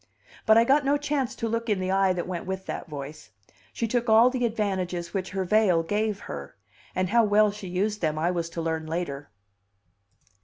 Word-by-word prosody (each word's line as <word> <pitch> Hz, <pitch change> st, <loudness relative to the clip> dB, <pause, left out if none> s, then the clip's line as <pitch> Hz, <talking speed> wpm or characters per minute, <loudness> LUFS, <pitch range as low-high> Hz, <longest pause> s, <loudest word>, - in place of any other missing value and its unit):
But 220 Hz, 0 st, +7 dB
I 230 Hz, -, +7 dB
got 275 Hz, +5 st, +3 dB
no 280 Hz, +1 st, +2 dB
chance 285 Hz, -3 st, -2 dB
to 230 Hz, -, -3 dB
look 230 Hz, +1 st, -2 dB
in 205 Hz, -3 st, +1 dB
the 185 Hz, 0 st, -1 dB
eye 195 Hz, 0 st, +3 dB
that 175 Hz, -1 st, -3 dB
went 180 Hz, -1 st, -5 dB
with 190 Hz, 0 st, -4 dB
that -, -, -5 dB
voice; 145 Hz, -1 st, -8 dB, 0.4 s
she 230 Hz, -, -2 dB
took 240 Hz, +1 st, 0 dB
all 225 Hz, +3 st, +6 dB
the 250 Hz, -2 st, 0 dB
advantages 190 Hz, -6 st, -2 dB
which 190 Hz, -2 st, -2 dB
her 190 Hz, 0 st, -2 dB
veil 185 Hz, -3 st, +3 dB
gave 210 Hz, +3 st, -1 dB
her; 70 Hz, -1 st, -8 dB, 0.4 s
and 185 Hz, -1 st, 0 dB
how 230 Hz, +2 st, +4 dB
well 210 Hz, 0 st, +4 dB
she 205 Hz, -1 st, -8 dB
used 205 Hz, +4 st, -1 dB
them 155 Hz, -2 st, 0 dB
I 170 Hz, +3 st, +1 dB
was 170 Hz, -2 st, -2 dB
to 165 Hz, 0 st, -5 dB
learn 160 Hz, -1 st, -2 dB
later. 150 Hz, -4 st, -4 dB
195 Hz, 205 wpm, -26 LUFS, 170-220 Hz, 0.4 s, But